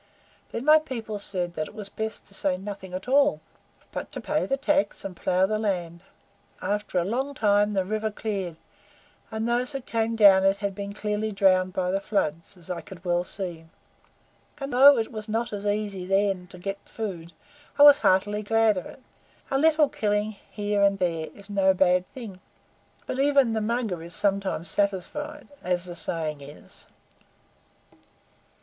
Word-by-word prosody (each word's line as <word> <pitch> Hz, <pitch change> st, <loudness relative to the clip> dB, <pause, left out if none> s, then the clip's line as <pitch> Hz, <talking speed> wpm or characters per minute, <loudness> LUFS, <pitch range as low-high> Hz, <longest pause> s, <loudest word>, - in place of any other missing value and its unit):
Then 235 Hz, -, -4 dB
my 305 Hz, +1 st, +7 dB
people 230 Hz, -8 st, -5 dB
said 180 Hz, -3 st, -3 dB
that 155 Hz, -2 st, -3 dB
it -, -, -14 dB
was 210 Hz, -2 st, -6 dB
best 220 Hz, +2 st, -5 dB
to 200 Hz, -, -15 dB
say 190 Hz, -1 st, 0 dB
nothing 195 Hz, -1 st, -7 dB
at 185 Hz, +5 st, -6 dB
all, 280 Hz, +2 st, +4 dB, 0.5 s
but -, -, -6 dB
to -, -, -4 dB
pay 305 Hz, 0 st, -1 dB
the 270 Hz, -, 0 dB
tax 290 Hz, -3 st, 0 dB
and 190 Hz, -2 st, -5 dB
plough 185 Hz, +2 st, +2 dB
the 215 Hz, +2 st, -1 dB
land. 175 Hz, -5 st, -2 dB, 0.6 s
After 205 Hz, -2 st, -2 dB
a 175 Hz, -, +3 dB
long 265 Hz, +7 st, -2 dB
time 205 Hz, -2 st, +3 dB
the 190 Hz, -1 st, +1 dB
river 215 Hz, +2 st, -1 dB
cleared, 200 Hz, -6 st, -4 dB, 0.7 s
and 220 Hz, 0 st, -3 dB
those 245 Hz, +4 st, 0 dB
that 270 Hz, -2 st, -5 dB
came 225 Hz, 0 st, -1 dB
down 200 Hz, -3 st, +7 dB
it 195 Hz, +1 st, +3 dB
had 200 Hz, -1 st, -2 dB
been 200 Hz, +1 st, -6 dB
clearly 210 Hz, +1 st, -2 dB
drowned 185 Hz, -2 st, +3 dB
by 180 Hz, -1 st, 0 dB
the 195 Hz, +1 st, 0 dB
floods, 170 Hz, -3 st, -2 dB
as 170 Hz, -, -14 dB
I 175 Hz, -, -3 dB
could 185 Hz, -1 st, -13 dB
well 175 Hz, 0 st, +1 dB
see; 175 Hz, -4 st, -6 dB, 0.9 s
and 275 Hz, -2 st, -5 dB
though 275 Hz, +2 st, +8 dB
it 225 Hz, -1 st, -1 dB
was 215 Hz, -1 st, -6 dB
not 230 Hz, +2 st, -1 dB
so 205 Hz, -, -4 dB
easy 205 Hz, -3 st, -2 dB
then 195 Hz, -2 st, +1 dB
to 180 Hz, -, -12 dB
get 195 Hz, +2 st, -4 dB
food, 180 Hz, -7 st, -5 dB, 0.5 s
I 290 Hz, -, +7 dB
was 290 Hz, -1 st, +9 dB
heartily 205 Hz, +3 st, +2 dB
glad 225 Hz, -1 st, +3 dB
of 180 Hz, -, -4 dB
it. 260 Hz, -, -14 dB, 0.5 s
A 270 Hz, -, +2 dB
little 310 Hz, 0 st, +4 dB
killing 215 Hz, -6 st, -1 dB
here 205 Hz, -1 st, -1 dB
and 200 Hz, 0 st, +4 dB
there 165 Hz, -4 st, -1 dB
is 200 Hz, -1 st, -13 dB
no 195 Hz, -2 st, +3 dB
bad 180 Hz, 0 st, +2 dB
thing 220 Hz, -8 st, -9 dB, 0.7 s
but 260 Hz, -, -4 dB
even 275 Hz, -4 st, +4 dB
the 220 Hz, -, 0 dB
Mugger 220 Hz, -5 st, -1 dB
is 170 Hz, 0 st, -5 dB
sometimes 195 Hz, -4 st, 0 dB
satisfied, 205 Hz, -, -1 dB
as 180 Hz, 0 st, 0 dB
the 175 Hz, -1 st, -7 dB
saying 155 Hz, -4 st, -2 dB
is." 140 Hz, +2 st, -7 dB
205 Hz, 180 wpm, -26 LUFS, 185-225 Hz, 0.9 s, was